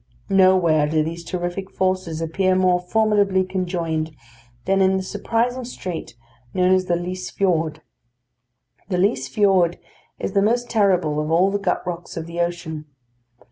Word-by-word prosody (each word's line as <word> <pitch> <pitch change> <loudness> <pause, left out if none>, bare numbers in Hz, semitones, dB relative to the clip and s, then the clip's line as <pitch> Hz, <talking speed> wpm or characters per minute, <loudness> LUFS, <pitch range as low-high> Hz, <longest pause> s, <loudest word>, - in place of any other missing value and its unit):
Nowhere 185 -6 +4
do 155 0 +2
these 170 +2 -5
terrific 175 +2 -4
forces 185 -4 -1
appear 185 +3 +1
more 185 -1 +3
formidably 200 0 +2
conjoined 170 -4 -2 0.5
than 195 +1 +2
in 190 0 +3
the 190 - -2
surprising 230 +6 -1
strait 185 - -6 0.4
known 185 0 +4
as 185 0 +2
the 175 - +1
Lyse 180 +1 -4
Fiord. 160 -5 0 1.1
The 180 - 0
Lyse 155 -9 +1
Fiord 180 +1 +2 0.4
is - - -3
the 195 - +2
most 240 +4 +1
terrible 185 -8 +2
of 150 0 -2
all 180 +4 +3
the 205 - -1
gut 200 - -1
rocks 175 -1 -6
of 160 - -4
the 170 +1 -7
ocean. 170 -3 -3
185 Hz, 150 wpm, -22 LUFS, 165-195 Hz, 1.1 s, Nowhere